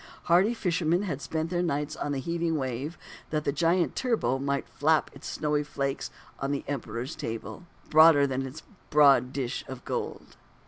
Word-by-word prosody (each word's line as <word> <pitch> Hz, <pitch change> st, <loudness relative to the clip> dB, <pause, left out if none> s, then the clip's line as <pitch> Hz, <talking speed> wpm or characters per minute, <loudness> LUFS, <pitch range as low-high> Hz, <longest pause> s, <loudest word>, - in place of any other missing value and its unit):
Hardy 190 Hz, +7 st, +4 dB
fishermen 175 Hz, -2 st, +1 dB
had 150 Hz, -8 st, -3 dB
spent 160 Hz, +2 st, -3 dB
their 175 Hz, -1 st, +1 dB
nights 150 Hz, -2 st, -1 dB
on 145 Hz, -, -3 dB
the 140 Hz, -, -1 dB
heaving 170 Hz, +3 st, -1 dB
wave, 135 Hz, +4 st, -3 dB, 0.3 s
that 155 Hz, -1 st, -1 dB
the 140 Hz, -, +1 dB
giant 170 Hz, +4 st, +1 dB
turbot 135 Hz, -, 0 dB
might 140 Hz, 0 st, -1 dB
flap 155 Hz, +1 st, +1 dB
its -, -, -10 dB
snowy 150 Hz, -1 st, 0 dB
flakes 140 Hz, -2 st, -3 dB, 0.3 s
on 135 Hz, +1 st, -2 dB
the 140 Hz, -, -2 dB
Emperor's 125 Hz, -1 st, -4 dB
table, 150 Hz, +5 st, -6 dB, 0.2 s
broader 155 Hz, -2 st, +7 dB
than 135 Hz, -1 st, -1 dB
its 135 Hz, +4 st, -7 dB, 0.3 s
broad 140 Hz, -4 st, +5 dB
dish 130 Hz, -3 st, -3 dB
of -, -, -8 dB
gold. -, -, -5 dB
150 Hz, 170 wpm, -28 LUFS, 135-165 Hz, 0.3 s, broader